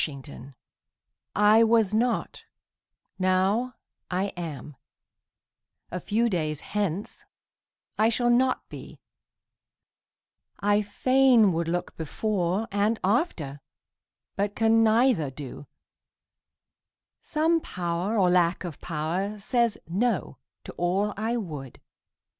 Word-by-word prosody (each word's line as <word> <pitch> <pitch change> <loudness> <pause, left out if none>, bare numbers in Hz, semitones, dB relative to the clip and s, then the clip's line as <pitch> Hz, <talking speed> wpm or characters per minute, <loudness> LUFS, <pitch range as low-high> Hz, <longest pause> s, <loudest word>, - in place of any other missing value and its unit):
THE 150 - -3
MYSTERY 135 0 -11 0.8
I 210 +2 +6
was 225 -3 +3
not; 235 +3 0 0.8
now 190 +7 +1 0.3
I 185 +2 -1
am 155 -4 -7 1.2
a 180 - -3
few 220 +6 +1
days 155 -7 -2
hence 205 -2 -3 0.8
I 220 +1 +5
shall 240 +1 +1
not 255 +2 +2
be; - - -11 1.6
I 205 +1 +2
fain 240 0 +4
would 165 0 -1
look 175 +1 -3
before 190 +4 -1
And 205 +3 +1
after, 185 - -1 0.7
but 205 +1 -1
can 225 0 +4
neither 225 - +3
do; 140 +1 -9 1.5
some 325 +2 +1
Power 180 - -2
Or 185 -3 +4
lack 175 0 +2
of 170 -5 -7
power 175 +6 -3
says 235 +1 0
"no" 190 - -1 0.2
to - - -8
all 195 +4 0
I 225 +3 -1
would. 150 - -7
200 Hz, 105 wpm, -26 LUFS, 170-225 Hz, 1.6 s, I